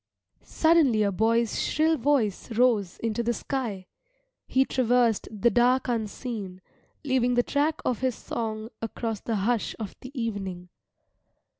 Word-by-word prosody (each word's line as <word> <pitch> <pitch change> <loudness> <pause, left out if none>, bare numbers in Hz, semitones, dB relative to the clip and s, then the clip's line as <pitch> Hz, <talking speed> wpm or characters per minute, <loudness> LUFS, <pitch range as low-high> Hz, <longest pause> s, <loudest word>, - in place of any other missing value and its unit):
Suddenly 315 -10 +3
a 200 - +1
boy's 225 +3 +1
shrill 315 +2 +2
voice 255 -8 0
rose 220 -6 +2
into 225 0 0
the 235 0 0
sky. 225 -7 -3 0.6
He 265 +1 +3
traversed 245 -4 +2
the 225 +2 +2
dark 250 +2 +3
unseen, 220 -4 -4 0.4
leaving 255 -3 +1
the 245 - +3
track 300 +4 0
of 250 - 0
his 255 -2 0
song 220 -1 -4
across 225 -1 -3
the 230 - -2
hush 215 +3 0
of 215 -4 -6
the 255 - -8
evening. 195 -6 -4
235 Hz, 135 wpm, -26 LUFS, 215-255 Hz, 0.6 s, Suddenly